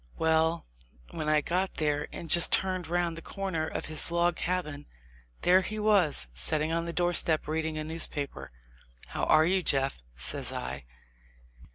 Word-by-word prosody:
Well, 160 +1 +1 0.5
when 155 -1 -3
I 155 0 +3
got 185 +5 -2
there 150 -1 -1
and 170 - -7
just 170 +2 +5
turned 185 -2 +2
round 175 0 -1
the 165 - -8
corner 175 -4 -3
of - - -5
his 155 +1 +1
log 170 0 +1
cabin, 160 -6 -3 0.6
there 185 +1 +5
he 215 +3 -4
was, 200 - +2
set 65 - +2
ting 155 +1 -1
on 165 0 -1
the 170 - -4
doorstep 170 -3 +1
reading 160 0 -2
a 155 - -3
newspaper. 155 -3 -3 0.6
"How - - -2
are 155 0 +5
you, 185 +2 +2
Jeff?" 135 - +1
says 60 - -2
I. 65 +1 -6
160 Hz, 165 wpm, -28 LUFS, 150-175 Hz, 0.6 s, just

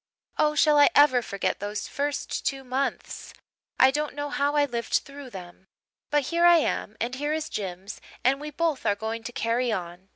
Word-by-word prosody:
Oh, 300 0 +3
shall 300 -1 +4
I 285 - +7
ever 280 -4 +6
forget 200 -4 -2
those 205 +1 -4
first 285 0 -3
two 270 -1 -2
months! 260 +2 -4 0.4
I 260 - +7
don't 300 +1 -3
know 290 0 -4
how 285 +1 0
I 290 -1 +4
lived 235 -4 -5
through 280 -1 -2
them. 185 -2 -11 0.4
But 295 -1 +2
here 340 0 +2
I 345 -1 +7
am 225 -8 -1
and 240 +2 -2
here 290 +3 -2
is 310 0 -3
Jims 190 0 -6 0.2
and 270 +3 +2
we 300 - -5
both 315 -1 -1
are 200 - +2
going 220 +2 -4
to 245 - -5
'carry 235 +1 0
on.' 180 -1 -5
265 Hz, 195 wpm, -26 LUFS, 220-290 Hz, 0.4 s, I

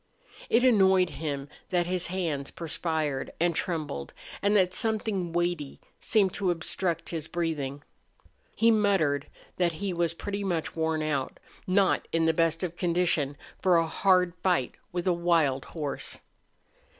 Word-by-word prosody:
It 235 +2 +4
annoyed 190 -7 +5
him 140 -1 -4 0.2
that 175 -2 +1
his 180 0 0
hands 165 -7 -2
perspired 160 -4 -2
and 170 +1 +2
trembled 155 - -3 0.3
and 205 +1 +2
that 185 -2 +3
something 215 -5 0
weighty 175 -4 -1 0.2
seemed 200 -5 +2
to 195 -2 0
obstruct 170 0 -1
his 160 -2 -4
breathing. 145 -5 -3 0.7
He 230 0 +4
muttered 190 -10 +2 0.3
that 175 -2 +2
he 195 +3 -3
was 170 -1 0
pretty 200 +3 -4
much 175 -5 -2
worn 160 -1 0
out, 145 -4 -2 0.3
not 190 +1 +2
in 165 0 +2
the 160 - +3
best 165 +1 +1
of 175 -2 -3
condition 170 -6 +1 0.2
for 180 -2 +4
a 165 - +3
hard 180 +1 +3
fight 175 -10 +1 0.2
with 175 0 -3
a 185 - +3
wild 165 -6 +2
horse. 150 -4 -5
170 Hz, 145 wpm, -28 LUFS, 155-185 Hz, 0.7 s, annoyed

